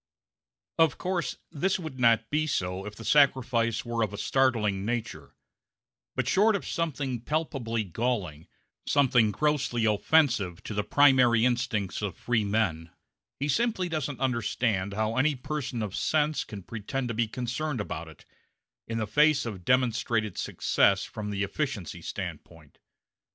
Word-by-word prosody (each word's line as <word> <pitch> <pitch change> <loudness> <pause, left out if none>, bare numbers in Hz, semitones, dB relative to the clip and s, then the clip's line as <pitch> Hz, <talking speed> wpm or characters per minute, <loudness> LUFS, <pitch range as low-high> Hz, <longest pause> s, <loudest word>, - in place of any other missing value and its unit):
Of 160 -6 +4
course 175 -7 -2
this 185 +6 0
would 160 -7 -7
not 115 -2 +3
be 155 +1 +1
so 95 -7 -2
if 105 - -8
the 115 - -10
sacrifice 125 -6 +3
were 120 -1 -2
of 105 -2 -2
a - - -5
startling 105 -5 +1
nature; 110 -10 -4 0.8
but - - -1
short 215 +2 +4
of 200 - -3
something 140 -7 -2
palpably 125 -6 -2
galling, 95 -6 -3 0.4
something 125 -6 +4
grossly 135 -3 0
offensive 110 - +2
to - - -6
the 105 0 -1
primary 125 -5 +5
instincts 120 -6 -1
of 100 -5 -4
freemen, 105 -8 0 0.5
he 140 - -1
simply 190 - +1
doesn't 145 -5 -3
understand 115 -5 0
how 110 +3 -1
any 145 +3 +3
person 130 -3 -4
of 100 -3 -5
sense 155 -1 +1
can 100 -3 -9
pretend 120 +6 -4
to - - -2
be 115 0 0
concerned 125 +4 -3
about 85 -5 -5
it, 80 - -15 0.6
in 115 - -3
the 110 - -1
face 150 +7 +3
of 100 -6 -6
demonstrated 115 -3 +1
success 100 -1 +2
from 105 -1 -6
the 100 -1 -1
efficiency 110 - -3
standpoint. 80 -4 -8
120 Hz, 145 wpm, -28 LUFS, 105-140 Hz, 0.8 s, primary